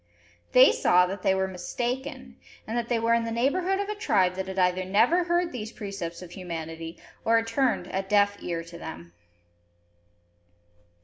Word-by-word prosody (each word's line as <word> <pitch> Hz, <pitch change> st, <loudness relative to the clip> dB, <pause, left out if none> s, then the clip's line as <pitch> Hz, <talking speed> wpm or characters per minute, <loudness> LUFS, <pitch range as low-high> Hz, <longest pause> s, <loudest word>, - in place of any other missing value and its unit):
They 255 Hz, +2 st, +8 dB
saw 180 Hz, 0 st, +4 dB
that 190 Hz, +1 st, -5 dB
they 190 Hz, -, +2 dB
were 190 Hz, 0 st, 0 dB
mistaken; 245 Hz, -, -4 dB, 0.3 s
and 225 Hz, -, -4 dB
that 235 Hz, -1 st, -2 dB
they 240 Hz, -, +2 dB
were 230 Hz, +1 st, +2 dB
in 235 Hz, 0 st, +2 dB
the 230 Hz, -, -3 dB
neighbourhood 350 Hz, +11 st, +1 dB
of 405 Hz, -, -2 dB
a 420 Hz, -, -2 dB
tribe 200 Hz, -, +2 dB
that 190 Hz, 0 st, -4 dB
had 190 Hz, 0 st, -6 dB
either 180 Hz, 0 st, +2 dB
never 230 Hz, -, +3 dB
heard 345 Hz, 0 st, +1 dB
these 220 Hz, -3 st, -6 dB
precepts 195 Hz, -6 st, -6 dB
of 175 Hz, -, -11 dB
humanity, 165 Hz, -2 st, -6 dB, 0.3 s
or 230 Hz, -, +3 dB
had 225 Hz, -, +1 dB
turned 235 Hz, -4 st, +1 dB
a 190 Hz, -, -2 dB
deaf 205 Hz, +1 st, +2 dB
ear 170 Hz, -1 st, -3 dB
to 170 Hz, 0 st, -11 dB
them. 85 Hz, -, -9 dB
200 Hz, 180 wpm, -27 LUFS, 180-245 Hz, 0.3 s, They